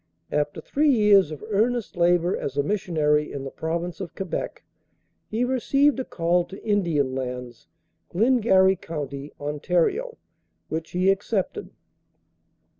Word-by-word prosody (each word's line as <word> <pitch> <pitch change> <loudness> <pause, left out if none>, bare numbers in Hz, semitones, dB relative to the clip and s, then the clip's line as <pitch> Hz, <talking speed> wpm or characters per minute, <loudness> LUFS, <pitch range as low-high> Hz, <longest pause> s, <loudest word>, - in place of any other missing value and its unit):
After 150 0 -1
three 300 +2 +1
years 210 - +5
of 155 +3 -8
earnest 225 +1 0
labor 175 0 +3
as 140 0 -5
a 145 - +3
missionary, 150 -5 +1
in 140 - -5
the 135 - -6
Province 170 +4 -3
of 175 - -7
Quebec, 190 -4 -4 0.6
he 225 +3 -1
received 270 +3 +2
a - - -1
call 175 -4 +1
to 195 +3 -10
Indian 170 -11 +1
Lands, 125 -2 -6 0.4
Glengarry 195 -3 +4
County, 145 -4 -6
Ont., 150 +2 -6 1.0
which 160 +1 -4
he 185 +2 +3
accepted. 200 - -2
175 Hz, 125 wpm, -24 LUFS, 150-210 Hz, 1.0 s, years